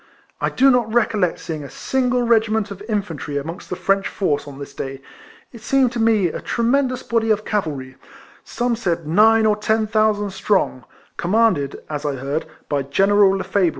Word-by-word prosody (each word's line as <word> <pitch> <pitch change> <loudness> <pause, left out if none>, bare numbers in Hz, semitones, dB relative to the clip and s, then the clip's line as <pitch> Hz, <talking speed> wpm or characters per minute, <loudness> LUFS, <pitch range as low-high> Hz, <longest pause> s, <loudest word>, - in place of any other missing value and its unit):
I - - +1
do 270 +1 +4
not 240 -3 +1
recollect 215 -6 +1
seeing 155 -3 -6
a 140 - -8
single 250 -2 0
regiment 220 -3 +2
of 200 0 -8
in 210 -2 +1
fantry 150 -5 -5
amongst 165 +6 -8
the - - -3
French 195 +2 +1
force 150 -7 -1
on 140 -1 -9
this 140 0 -9
day; 135 0 -6 0.5
it 235 - -12
seemed 260 +1 +2
to 240 - -4
me 220 -5 +3
a - - -6
tremendous 255 +2 0
body 230 -1 0
of 215 0 +1
cavalry 145 -11 -3 0.2
— - - -24
some 240 -1 -1
said 175 -7 -2
nine 220 +7 +4
or 215 -1 +3
ten 220 +1 0
thousand 215 -2 +1
strong 190 - 0 0.2
— - - -33
commanded, 185 -7 +1
as 150 -1 -5
I 145 -2 -1
heard, 140 +5 -3 0.2
by 145 -2 0
General 195 +8 +3
Lefebvre. 190 -2 +1
205 Hz, 185 wpm, -20 LUFS, 160-225 Hz, 0.5 s, do